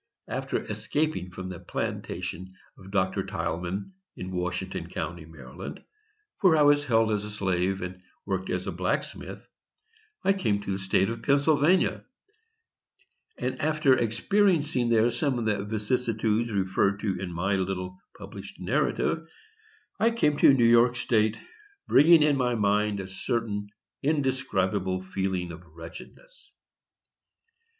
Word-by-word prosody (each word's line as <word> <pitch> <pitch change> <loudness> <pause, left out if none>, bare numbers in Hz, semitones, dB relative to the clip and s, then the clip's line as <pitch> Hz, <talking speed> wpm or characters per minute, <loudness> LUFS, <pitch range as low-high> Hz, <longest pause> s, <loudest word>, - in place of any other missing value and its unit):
After - - -2
escaping 110 - -2
from 95 +1 -7
the 90 -2 -7
plantation 95 +2 -4 0.2
of 95 - -14
Dr. 95 -1 0
Tilghman, 90 - -3 0.3
in 90 0 -6
Washington 90 0 -3
County, 85 -2 -5
Md., 70 -2 -9 0.6
where 180 -5 +5
I 150 - +5
was 145 0 +5
held 115 -3 +3
as 105 -1 0
a 105 - -6
slave, 95 -2 -1
and 90 +1 -7 0.2
worked 95 -1 -2
as 90 0 -2
a 95 - -2
blacksmith, 90 +1 -3 0.8
I 195 - +4
came 110 - 0
to 100 - -3
the 95 - -2
State 95 +2 +1
of 115 0 -6
Pennsylvania, 145 +6 +3 1.3
and, - - -3
after 155 -3 +3
experiencing 145 - +2
there 115 +1 +4
some 130 +2 0
of 120 - -2
the 105 -2 0
vicissitudes 110 +1 0
referred 100 0 +1
to 95 -4 -1
in 95 -2 -4
my 95 +4 0
little 95 -1 -3 0.2
published - - -10
narrative, 165 0 0 0.7
I 225 +3 +4
came 230 -10 +2
into 145 - +6
New 130 -4 +4
York 120 +1 +5
State, 110 -2 +1 0.5
bringing 160 +2 +7
in 150 -2 +3
my 125 -2 +1
mind 105 -1 +1
a 95 - -5
certain 105 +1 -3 0.3
indescribable 105 - 0
feeling 95 -2 -2
of 85 +1 -10
wretchedness. 85 - -13
105 Hz, 135 wpm, -27 LUFS, 95-130 Hz, 1.3 s, bringing